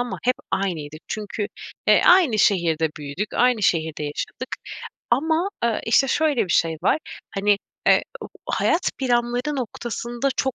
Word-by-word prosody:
ama 245 0 -3
hep 250 +1 +2 0.2
aynıydık. 155 -6 -2
Çünkü, 210 -1 -3 0.4
e, - - +6
aynı 345 - +5
şehirde 170 -6 +2
büyüdük. 150 +8 -5
Aynı 245 -3 +3
şehirde 160 -4 +1
yaşadık. 145 0 -5 0.6
Ama, 320 +9 +2 0.2
eee, 230 -2 +1
işte, 265 +4 +4
şöyle 295 -3 +2
bir 175 - -2
şey 165 -1 +2
var: 295 - +3 0.4
Hani, 200 +1 +2 0.3
eee, - - +5 0.2
u - - -7 0.2
hayat 350 +2 +1
planları 245 +2 0
noktasında 240 +1 -3
çok 265 -2 0
235 Hz, 140 wpm, -23 LUFS, 180-260 Hz, 0.6 s, e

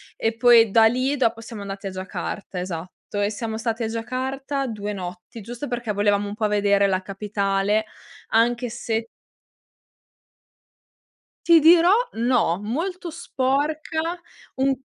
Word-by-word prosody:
e 225 0 -1
poi 235 -3 +6
da 225 +1 +6
lì 255 +5 +1
dopo 230 -3 +1
siamo 225 -2 -8
andati 195 0 -6
a - - -4
Giacarta, 185 0 -5
esatto, 180 +3 -5
e 205 - +2
siamo 220 +1 -4
stati 225 0 -2
a - - 0
Giacarta 265 +4 -3
2 210 -2 -4
notti 180 +3 -8
giusto 240 +6 -6
perché 240 -3 -3
volevamo 205 0 +1
un 205 - -5
po' 215 0 0
vedere 200 -1 +3
la 185 -1 0
capitale 200 +1 -1 0.4
anche 240 +2 +2
se 225 -1 -3 2.4
Ti 335 -1 +8
dirò 335 +3 +6 0.2
no, 235 -7 +2
molto 340 - -3
sporca, 310 +3 -1 0.4
un 270 +1 +2
225 Hz, 135 wpm, -23 LUFS, 205-260 Hz, 2.4 s, Ti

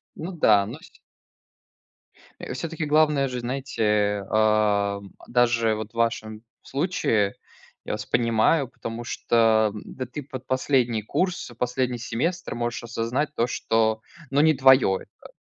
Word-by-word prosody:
Ну 170 +4 -6
да, 105 - +4
ну 120 - -6
се - - -16 1.5
Э, - - -6
всё-таки 160 +3 -4
главное 150 -2 +3
же, 125 -1 -4
знаете, 105 -6 0
а, 105 -2 +2
м, 100 -1 -14
даже 120 -2 +2
вот 110 0 -6
в - - -34
вашем 110 -2 -1 0.2
случае, 130 - 0 0.5
я - - -4
вас - - -5
понимаю, 120 +5 +2
потому 115 -2 -7
что, 120 - -3 0.3
а, - - -7
да 130 +4 -7
ты 145 +4 -7
под 130 -1 -9
последний 130 -4 +1
курс, 180 - -2
последний 125 0 -1
семестр 165 +10 -2
можешь 120 0 -3
осознать, 120 +6 -2
то 120 - +1
что, 110 -2 0 0.3
ну 140 +1 +2
не 155 0 +5
твоё 130 -7 +5
это. - - -16
120 Hz, 145 wpm, -24 LUFS, 110-135 Hz, 1.5 s, не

